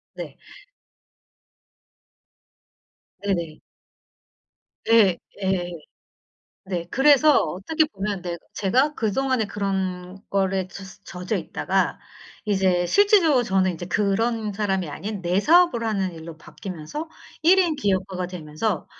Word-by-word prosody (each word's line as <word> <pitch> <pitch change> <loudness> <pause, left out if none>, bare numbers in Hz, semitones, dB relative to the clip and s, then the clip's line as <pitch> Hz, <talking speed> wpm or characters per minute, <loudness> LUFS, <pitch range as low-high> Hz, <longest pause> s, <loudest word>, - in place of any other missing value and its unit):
네. - - -8 2.9
네네. 170 -6 -2 1.3
네. 215 -6 +5 0.3
예. 185 -2 0 0.9
네 180 -3 -4
그래서 290 +2 +5
어떻게 200 - 0
보면 200 -6 -4
내 175 -2 -4 0.2
제가 255 +10 +2
그동안에 250 +1 0
그런 190 -2 -3
거에 190 -1 0
젖 195 +1 -9 0.4
젖어 - - 0
있다가 - - -1 0.5
이제 190 -4 +2
실제적으로 365 - +4
저는 190 -4 +1
이제 175 +1 -7
그런 210 +3 0
사람이 195 -4 -1
아닌 200 +6 -6
내 180 +2 +1
사업을 335 -3 +4
하는 195 -4 -1
일로 165 0 -9
바뀌면서 185 - -7 0.3
1 355 +4 +6
인 350 -4 +3
기업가가 190 -6 -1
되면서 175 +2 -3
195 Hz, 220 characters per minute, -23 LUFS, 180-235 Hz, 2.9 s, 1